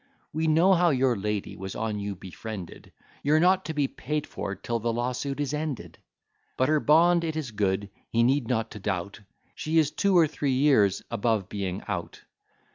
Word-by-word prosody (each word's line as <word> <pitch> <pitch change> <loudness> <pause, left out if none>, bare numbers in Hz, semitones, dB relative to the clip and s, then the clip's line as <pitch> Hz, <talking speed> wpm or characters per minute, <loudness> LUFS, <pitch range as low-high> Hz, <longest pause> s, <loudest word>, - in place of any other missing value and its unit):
We 160 +1 0
know 165 +5 +5
how 175 -1 +4
your 130 -4 +2
lady 105 0 -3
was 95 0 -7
on 110 -2 -2
you 100 0 -4
befriended; 95 +1 -8 0.3
You're 150 +2 +3
not 185 +3 +3
to 160 - -3
be 145 -2 +2
paid 150 +2 -3
for 100 - -5
'till 115 +5 -3
the 115 +1 -1
lawsuit 125 +4 -2
is 145 0 -1
ended: 150 -4 -4 0.6
But 130 - +2
her 155 0 +4
bond 170 +4 +4
it 160 -1 -2
is 150 -7 -3
good, 100 -1 -1 0.2
he 115 +1 +2
need 130 0 +2
not 115 -2 -1
to 105 - -8
doubt; 100 +1 -3 0.3
She 160 +1 -1
is 155 -2 +4
two 195 -2 +2
or 165 - +7
three 145 -3 -1
years 130 -8 +3
above 110 -3 0
being 100 -2 -4
out. 90 -4 -5
125 Hz, 190 wpm, -27 LUFS, 105-155 Hz, 0.6 s, or